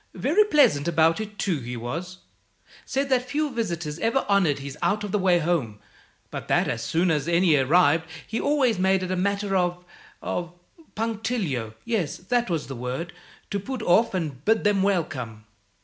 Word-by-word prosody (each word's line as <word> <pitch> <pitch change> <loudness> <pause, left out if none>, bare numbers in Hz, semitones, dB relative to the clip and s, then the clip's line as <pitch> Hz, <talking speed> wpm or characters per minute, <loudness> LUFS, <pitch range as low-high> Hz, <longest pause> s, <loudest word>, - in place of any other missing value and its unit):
Very 400 +9 +3
pleasant 225 - +3
about 165 +3 +3
it, 210 -1 -8
too, 175 -7 0
he 120 -1 -6
was; 165 +11 -5 0.7
said 275 +1 -1
that 250 -1 +1
few 295 +2 -1
visitors 170 -10 -3
ever 230 +7 +1
honoured 195 -8 +3
his 140 0 -7
out 210 +1 +1
of 205 - -4
the 210 - +1
way 185 -2 +4
home, 155 -11 -1 0.5
but - - -6
that - - +2
as - - -2
soon 170 +2 +1
as 150 -1 0
any 170 -1 +4
arrived 155 +3 +3 0.2
he 225 - -3
always 265 -8 +2
made 190 0 +2
it 185 - -3
a - - +1
matter 200 +1 0
of 180 -1 0 0.3
of 175 -1 -4 0.4
punctilio 210 - -2
(yes, 220 -10 -1
that 240 +5 -1
was 165 -3 -1
the 135 - -7
word) 130 +8 -4 0.4
to 200 - -1
put 255 +3 -5
off 215 +2 +3
and 150 -7 -3
bid 220 +4 +2
them 205 -2 +3
welcome. 130 - -2
180 Hz, 180 wpm, -25 LUFS, 155-220 Hz, 0.7 s, way